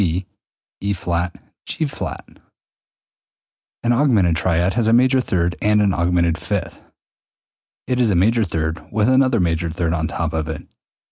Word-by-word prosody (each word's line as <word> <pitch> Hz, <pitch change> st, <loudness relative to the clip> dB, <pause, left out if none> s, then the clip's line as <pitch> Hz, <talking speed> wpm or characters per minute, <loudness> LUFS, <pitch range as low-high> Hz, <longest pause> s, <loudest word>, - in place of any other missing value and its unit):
C 90 Hz, 0 st, 0 dB, 0.6 s
E[flat] 90 Hz, -3 st, -2 dB, 0.3 s
G[flat]. 155 Hz, -3 st, -4 dB, 1.5 s
An 120 Hz, -, +2 dB
augmented 115 Hz, -, +3 dB
triad 85 Hz, +2 st, +1 dB
has 115 Hz, -1 st, +1 dB
a 115 Hz, -, +4 dB
major 130 Hz, +2 st, +4 dB
third 85 Hz, -6 st, 0 dB
and 105 Hz, 0 st, +3 dB
an 100 Hz, -2 st, +3 dB
augmented 85 Hz, -1 st, +1 dB
fifth, -, -, -3 dB
i.e., -, -, -28 dB, 1.0 s
it 125 Hz, -1 st, -1 dB
is 120 Hz, -3 st, +3 dB
a 100 Hz, -, +2 dB
major 110 Hz, +6 st, +3 dB
third 80 Hz, -3 st, -3 dB
with 105 Hz, 0 st, +1 dB
another 130 Hz, -2 st, +3 dB
major 85 Hz, -1 st, 0 dB
third 85 Hz, 0 st, -1 dB
on 80 Hz, -1 st, -1 dB
top 80 Hz, 0 st, -3 dB
of 80 Hz, -1 st, -2 dB
it. 80 Hz, -, -6 dB
90 Hz, 150 wpm, -20 LUFS, 85-115 Hz, 1.5 s, a